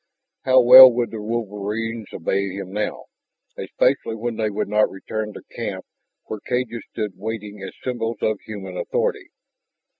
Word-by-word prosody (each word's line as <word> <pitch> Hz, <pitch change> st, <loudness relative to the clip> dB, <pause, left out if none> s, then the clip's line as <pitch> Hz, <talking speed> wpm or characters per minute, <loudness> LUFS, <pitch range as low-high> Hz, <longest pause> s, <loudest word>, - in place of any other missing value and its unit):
How 130 Hz, 0 st, +6 dB
well 130 Hz, +1 st, +11 dB
would 120 Hz, 0 st, -1 dB
the 110 Hz, -2 st, -6 dB
wolverines 110 Hz, 0 st, -4 dB
obey 95 Hz, +3 st, -1 dB
him 95 Hz, -1 st, -7 dB
now, 105 Hz, +1 st, -3 dB, 0.5 s
especially 110 Hz, -, 0 dB
when 115 Hz, +1 st, -4 dB
they 110 Hz, -1 st, -1 dB
would 105 Hz, +1 st, -3 dB
not 105 Hz, +1 st, +2 dB
return 105 Hz, +2 st, -5 dB
to -, -, -11 dB
camp -, -, -5 dB, 0.4 s
where 110 Hz, -, -6 dB
cages 125 Hz, 0 st, -3 dB
stood 105 Hz, -2 st, -3 dB
waiting 105 Hz, -1 st, -6 dB
as 95 Hz, -, -8 dB
symbols 115 Hz, -3 st, -3 dB
of 110 Hz, -2 st, 0 dB
human 95 Hz, -4 st, -8 dB
authority? -, -, -2 dB
110 Hz, 150 wpm, -22 LUFS, 100-115 Hz, 0.5 s, well